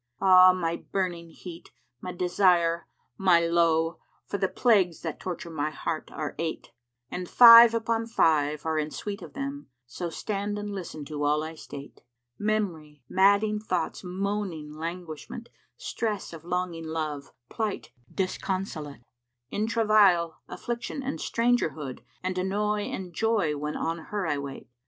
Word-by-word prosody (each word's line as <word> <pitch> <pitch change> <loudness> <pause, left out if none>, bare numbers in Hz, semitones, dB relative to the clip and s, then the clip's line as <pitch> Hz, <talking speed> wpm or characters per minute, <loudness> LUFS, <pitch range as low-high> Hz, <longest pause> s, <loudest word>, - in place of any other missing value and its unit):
Ah 185 -1 +8
my 170 -2 -1
burning 175 -3 -3
heat, 170 +1 -11 0.3
my 180 - -5
desire, 175 -2 +2 0.3
my 185 -3 +5
lowe! 165 -1 +2
* - - -40
For 200 - -4
the 190 - +2
plagues 190 - +2
that 160 -2 -4
torture 175 -2 -5
my 150 -1 -1
heart 155 0 -4
are 150 -2 -4
eight; 165 -1 -4 0.4
And 180 -1 -5
five 230 -1 +10
upon 230 0 -1
five 150 -9 +2
are 160 -1 0
in 150 0 -2
suite 205 +5 -6
of - - -10
them; 280 +1 -5
* 125 - -54
So 175 -1 -2
stand 205 +3 -3
and 205 0 -4
listen 175 -6 -6
to 145 0 -4
all 150 +1 +2
I 160 +1 -6
state: 145 -3 -10 0.4
Mem'ry, 170 - -2
madding 200 +3 +3
thoughts, 185 -5 -2
moaning 185 -4 -3
languishment, 165 +6 -7 0.2
* - - -49
Stress 210 -6 -3
of 165 -1 -9
longing 175 -2 -3
love, 155 -3 -4 0.2
plight 215 -3 -3 0.2
disconsolate; 185 - -3 0.5
In 215 +2 -1
travail, 210 -7 +4
affliction 240 +3 -5
and 275 +2 -3
strangerhood, 160 - 0
* - - -36
And 185 0 -2
annoy 205 +2 0
and 180 -2 -6
joy 210 -6 +1
when 150 +1 -3
on 165 +1 -2
her 205 -2 -3
I 150 -3 0
wait. 140 -1 -7
180 Hz, 150 wpm, -27 LUFS, 160-205 Hz, 0.5 s, five